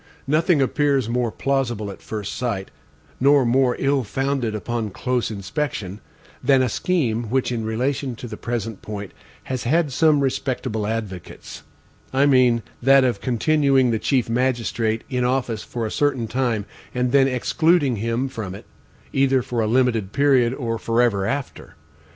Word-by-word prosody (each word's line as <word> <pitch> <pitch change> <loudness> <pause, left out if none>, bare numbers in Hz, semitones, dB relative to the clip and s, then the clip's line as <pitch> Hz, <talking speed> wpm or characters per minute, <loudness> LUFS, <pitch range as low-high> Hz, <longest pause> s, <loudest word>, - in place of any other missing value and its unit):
Nothing 155 +1 +3
appears 140 -2 +1
more 120 0 0
plausible 120 -6 -1
at - - -12
first 105 -2 -5
sight, 115 -6 -3 0.5
nor 140 0 +5
more 125 +1 +3
ill 135 -1 +1
founded 135 -1 -1
upon 115 0 -3
close 125 +4 -1
inspection, 105 - -4 0.4
than 135 0 +4
a 125 - +1
scheme 120 -6 0
which 130 +1 0
in 115 -2 -2
relation 125 +3 -2
to 125 +1 -8
the 110 - -7
present 115 -2 -4
point 100 -2 -6 0.3
has 130 -2 -4
had 155 +3 +2
some 150 +1 +3
respectable 130 -5 -2
advocates 105 -6 -6 0.5
I 135 +2 +3
mean 125 -4 +4 0.2
that 135 +2 +6
of 125 -2 0
continuing 135 0 +2
the 110 - 0
chief 130 0 +1
magistrate 115 -2 0
in 125 -2 -1
office 125 -3 0
for 120 -2 -4
a 110 - -4
certain 135 -6 0
time, 120 -3 -1 0.3
and 125 0 0
then 135 0 +5
excluding 140 +1 +2
him 115 +5 -1
from 110 -8 -6
it, - - -11 0.5
either 135 -1 +3
for 120 -1 -2
a 110 - 0
limited 115 -4 +1
period 130 -4 +3
or 115 -4 -3
forever 115 -4 +1
after. 140 -2 -5
125 Hz, 155 wpm, -22 LUFS, 115-135 Hz, 0.5 s, that